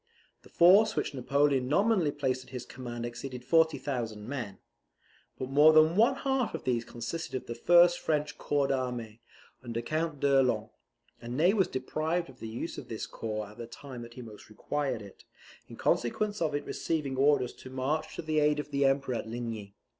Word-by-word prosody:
The -, -, -18 dB
force 195 Hz, +6 st, +6 dB
which -, -, -1 dB
Napoleon 135 Hz, 0 st, +1 dB
nominally 195 Hz, -, +3 dB
placed 130 Hz, -3 st, -1 dB
at -, -, -18 dB
his 125 Hz, -2 st, -6 dB
command 120 Hz, -2 st, -6 dB
exceeded 125 Hz, +1 st, -7 dB
40,000 135 Hz, -9 st, +1 dB
men. 120 Hz, -8 st, -5 dB, 0.8 s
But 130 Hz, 0 st, -5 dB
more 150 Hz, +3 st, +7 dB
than 155 Hz, +2 st, +6 dB
one 235 Hz, +6 st, +4 dB
half 270 Hz, -3 st, -1 dB
of -, -, -6 dB
these 120 Hz, -2 st, 0 dB
consisted 120 Hz, +9 st, -5 dB
of 130 Hz, -, -4 dB
the 120 Hz, -, -5 dB
first 175 Hz, +7 st, +5 dB
French 150 Hz, -1 st, -1 dB
corps 145 Hz, -1 st, +1 dB
d'armee, 125 Hz, -4 st, -3 dB, 0.4 s
under 115 Hz, -2 st, -3 dB
Count 155 Hz, +2 st, -2 dB
d'Erlon; 130 Hz, -6 st, +2 dB, 0.5 s
and 120 Hz, +1 st, -5 dB
Ney 175 Hz, +6 st, +4 dB
was 195 Hz, -4 st, +3 dB
deprived 155 Hz, +6 st, -2 dB
of 130 Hz, -, -21 dB
the 115 Hz, -, -6 dB
use 120 Hz, +9 st, -5 dB
of -, -, -10 dB
this 110 Hz, -, -4 dB
corps 110 Hz, -2 st, -5 dB
at 105 Hz, +3 st, -15 dB
the 115 Hz, -, -6 dB
time 130 Hz, 0 st, -9 dB
that 120 Hz, 0 st, -10 dB
he 125 Hz, -, -8 dB
most 110 Hz, -2 st, -12 dB
required 130 Hz, +1 st, -3 dB
it, 100 Hz, -, -14 dB, 0.4 s
in -, -, -10 dB
consequence 205 Hz, -, 0 dB
of 155 Hz, -3 st, 0 dB
its 145 Hz, -, -3 dB
receiving 150 Hz, -5 st, -2 dB
orders 135 Hz, -2 st, +3 dB
to 130 Hz, -, -12 dB
march 135 Hz, +4 st, -2 dB
to -, -, -5 dB
the 155 Hz, -1 st, +1 dB
aid 150 Hz, 0 st, +3 dB
of 150 Hz, 0 st, -6 dB
the 140 Hz, 0 st, +2 dB
Emperor 135 Hz, -1 st, +1 dB
at -, -, -5 dB
Ligny. 110 Hz, -4 st, -6 dB
135 Hz, 190 wpm, -30 LUFS, 120-155 Hz, 0.8 s, more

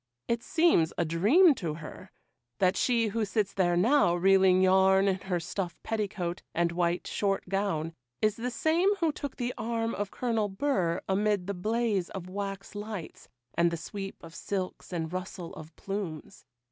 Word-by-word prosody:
It 235 Hz, 0 st, 0 dB
seems 320 Hz, -, +3 dB
a -, -, +1 dB
dream 220 Hz, -, +5 dB
to 165 Hz, -, -4 dB
her, 155 Hz, -1 st, -10 dB, 0.5 s
that 185 Hz, 0 st, +3 dB
she 230 Hz, -3 st, +2 dB
who 225 Hz, +2 st, -1 dB
sits 205 Hz, -1 st, -1 dB
there 175 Hz, -2 st, +2 dB
now 220 Hz, -2 st, +4 dB
reeling 190 Hz, 0 st, +5 dB
yarn 190 Hz, +1 st, +5 dB
in 190 Hz, -1 st, +1 dB
her 185 Hz, -2 st, -2 dB
stuff 175 Hz, +1 st, -4 dB
petticoat 190 Hz, -5 st, -2 dB
and 170 Hz, 0 st, +2 dB
white 175 Hz, 0 st, 0 dB
short 195 Hz, -2 st, -1 dB
gown 180 Hz, -5 st, -1 dB, 0.3 s
is 215 Hz, -1 st, +2 dB
the 240 Hz, +2 st, -3 dB
same 330 Hz, +10 st, +2 dB
who 335 Hz, -5 st, +1 dB
took 285 Hz, -2 st, -6 dB
the 245 Hz, -1 st, -2 dB
arm 230 Hz, 0 st, -1 dB
of 205 Hz, -1 st, -3 dB
Colonel 225 Hz, -3 st, -1 dB
Burr 195 Hz, -6 st, 0 dB
amid 205 Hz, -1 st, +1 dB
the 200 Hz, -, -2 dB
blaze 210 Hz, 0 st, 0 dB
of 185 Hz, -2 st, -7 dB
wax 195 Hz, 0 st, -5 dB
lights, 205 Hz, -5 st, -7 dB, 0.2 s
and 170 Hz, 0 st, +3 dB
the 170 Hz, -, -3 dB
sweep 195 Hz, +4 st, -6 dB
of 165 Hz, 0 st, -11 dB
silks 190 Hz, +1 st, -4 dB
and 165 Hz, -1 st, -3 dB
rustle 185 Hz, -1 st, -5 dB
of 155 Hz, 0 st, -10 dB
plumes. 195 Hz, -6 st, -6 dB
195 Hz, 170 wpm, -29 LUFS, 175-225 Hz, 0.5 s, dream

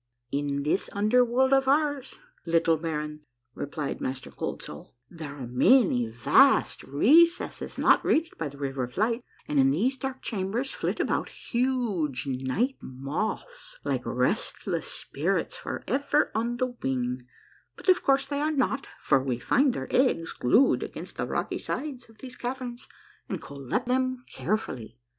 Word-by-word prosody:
" 120 Hz, 0 st, -50 dB
In 140 Hz, 0 st, -1 dB
this 155 Hz, +7 st, 0 dB
under 215 Hz, +5 st, +4 dB
world 260 Hz, +3 st, +2 dB
of 270 Hz, 0 st, +4 dB
ours, 285 Hz, -1 st, +1 dB, 0.3 s
little 165 Hz, -1 st, +3 dB
baron," 150 Hz, -1 st, -4 dB, 0.3 s
replied 145 Hz, +1 st, -4 dB
INIaster 130 Hz, 0 st, -5 dB
Cold -, -, -4 dB
Soul, 75 Hz, +8 st, -10 dB
" 125 Hz, -, -50 dB
there 155 Hz, -4 st, -7 dB
are 135 Hz, -3 st, -6 dB
many 125 Hz, -, +4 dB
vast 115 Hz, +1 st, +4 dB
recesses 325 Hz, -, +3 dB
not -, -, +4 dB
reached 325 Hz, +1 st, +1 dB
by 160 Hz, -, -3 dB
the 140 Hz, -, -13 dB
River 135 Hz, -2 st, -2 dB
of 125 Hz, -, -14 dB
Light, 230 Hz, +4 st, +1 dB, 0.2 s
and 150 Hz, -, +1 dB
in 135 Hz, 0 st, +5 dB
these 230 Hz, -, +1 dB
dark 265 Hz, 0 st, -5 dB
chambers 220 Hz, +5 st, -2 dB
flit -, -, -2 dB
about -, -, 0 dB
huge 230 Hz, -, -1 dB
night 135 Hz, -, -1 dB
moths, 215 Hz, -, -4 dB
like -, -, -1 dB
restless -, -, -1 dB
spirits -, -, -2 dB
forever 285 Hz, +2 st, 0 dB
on 235 Hz, +2 st, -1 dB
the 255 Hz, -1 st, -1 dB
wing, 125 Hz, -1 st, -1 dB, 0.5 s
but -, -, -13 dB
of 370 Hz, -1 st, +5 dB
course 275 Hz, 0 st, +3 dB
they 285 Hz, +1 st, -2 dB
are 305 Hz, +1 st, +1 dB
not, 270 Hz, -1 st, 0 dB
for 135 Hz, -3 st, +3 dB
we 130 Hz, -2 st, -1 dB
find 260 Hz, -, +2 dB
their -, -, -4 dB
eggs 250 Hz, -11 st, +2 dB
glued 235 Hz, -, +4 dB
against -, -, -7 dB
the -, -, -2 dB
rocky -, -, -2 dB
sides 265 Hz, -6 st, -5 dB
of 225 Hz, -, -19 dB
these 255 Hz, +1 st, -9 dB
caverns 245 Hz, -1 st, -5 dB, 0.4 s
and -, -, -2 dB
collect 140 Hz, -, -4 dB
them 255 Hz, 0 st, 0 dB
carefully. 130 Hz, -, -3 dB
215 Hz, 155 wpm, -27 LUFS, -, 0.5 s, in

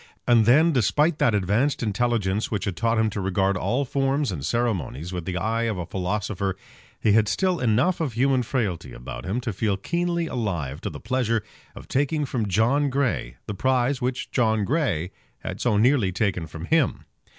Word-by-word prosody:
And 115 Hz, -3 st, +5 dB
then, 155 Hz, +7 st, +6 dB
despite 150 Hz, -, +2 dB
that 115 Hz, -, +3 dB
advanced 105 Hz, +9 st, +1 dB
intelligence 105 Hz, -2 st, 0 dB
which 105 Hz, -3 st, -2 dB
had 100 Hz, -4 st, -2 dB
taught 115 Hz, +5 st, +1 dB
him 110 Hz, -1 st, +2 dB
to 100 Hz, -, -3 dB
regard 95 Hz, +1 st, +1 dB
all 115 Hz, +10 st, 0 dB
forms 135 Hz, 0 st, 0 dB
and 75 Hz, -7 st, -5 dB
ceremonies 90 Hz, -, -2 dB
with 90 Hz, -2 st, -4 dB
the 90 Hz, 0 st, -3 dB
eye 115 Hz, +4 st, 0 dB
of 110 Hz, -4 st, -1 dB
a 90 Hz, -, -3 dB
philosopher, 95 Hz, +1 st, -2 dB, 0.4 s
he 110 Hz, -, +2 dB
had 110 Hz, 0 st, +4 dB
still 185 Hz, -, +1 dB
enough 125 Hz, +10 st, +2 dB
of 145 Hz, -7 st, -1 dB
human 130 Hz, +2 st, +2 dB
frailty 100 Hz, -, -2 dB
about -, -, -8 dB
him 100 Hz, +6 st, -1 dB
to 115 Hz, -3 st, -3 dB
feel 100 Hz, 0 st, 0 dB
keenly 170 Hz, -, -1 dB
alive 90 Hz, -, -3 dB
to -, -, -3 dB
the -, -, -8 dB
pleasure 115 Hz, -1 st, 0 dB, 0.3 s
of -, -, -11 dB
taking 145 Hz, +2 st, 0 dB
from 120 Hz, -5 st, -2 dB
John 120 Hz, +9 st, +2 dB
Grey 130 Hz, -, -1 dB
the -, -, -4 dB
prize 130 Hz, +4 st, +1 dB
which 125 Hz, +1 st, -2 dB
John 110 Hz, -4 st, +2 dB
Grey 100 Hz, -, 0 dB, 0.3 s
had -, -, -5 dB
so 105 Hz, -, +2 dB
nearly 115 Hz, -3 st, +3 dB
taken 90 Hz, -4 st, -1 dB
from 80 Hz, +1 st, -8 dB
him. 160 Hz, -, +1 dB
110 Hz, 185 wpm, -24 LUFS, 95-130 Hz, 0.4 s, then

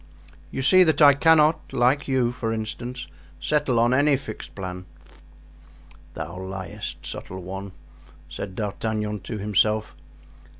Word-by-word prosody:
You 135 Hz, -, -4 dB
see 185 Hz, +7 st, +7 dB
that 160 Hz, -3 st, +2 dB
I 145 Hz, -2 st, +8 dB
cannot, 155 Hz, +2 st, +4 dB
like 125 Hz, +3 st, +2 dB
you, 130 Hz, -3 st, +2 dB
for 115 Hz, -2 st, -3 dB
instance, 120 Hz, +3 st, -5 dB, 0.3 s
settle 140 Hz, -, +1 dB
on 120 Hz, +2 st, +4 dB
any 140 Hz, +1 st, +4 dB
fixed 110 Hz, -5 st, -9 dB
plan." 90 Hz, -1 st, -6 dB, 1.3 s
"Thou 85 Hz, +4 st, -6 dB
liest, 95 Hz, -2 st, -6 dB
subtile 95 Hz, -, -6 dB
one," 95 Hz, +2 st, -6 dB, 0.6 s
said 95 Hz, -2 st, -7 dB
D'Artagnan 105 Hz, 0 st, -2 dB
to 105 Hz, +4 st, -6 dB
himself. 105 Hz, +1 st, +1 dB
115 Hz, 125 wpm, -24 LUFS, 100-135 Hz, 1.3 s, I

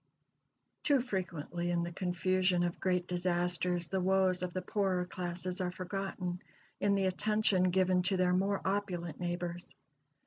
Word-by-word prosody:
Too 285 Hz, -2 st, +3 dB
frequently 175 Hz, -, -3 dB
in 170 Hz, -1 st, +1 dB
the 170 Hz, -, -4 dB
confusion 185 Hz, 0 st, +1 dB
of 175 Hz, 0 st, -2 dB
great 180 Hz, -2 st, +1 dB
disasters 175 Hz, 0 st, 0 dB
the 190 Hz, +2 st, -1 dB
woes 185 Hz, -1 st, +3 dB
of 180 Hz, -1 st, -2 dB
the 185 Hz, +1 st, -3 dB
poorer 185 Hz, -2 st, 0 dB
classes 180 Hz, +1 st, -3 dB
are 180 Hz, -, 0 dB
forgotten 185 Hz, -1 st, -4 dB, 0.4 s
in 200 Hz, 0 st, +3 dB
the 195 Hz, -1 st, +2 dB
attention 190 Hz, -1 st, +2 dB
given 185 Hz, 0 st, +3 dB
to 190 Hz, -, +1 dB
their 180 Hz, 0 st, +3 dB
more 195 Hz, +2 st, +1 dB
opulent 185 Hz, -5 st, -2 dB
neighbors. 175 Hz, 0 st, -4 dB
180 Hz, 145 wpm, -33 LUFS, 175-190 Hz, 0.4 s, Too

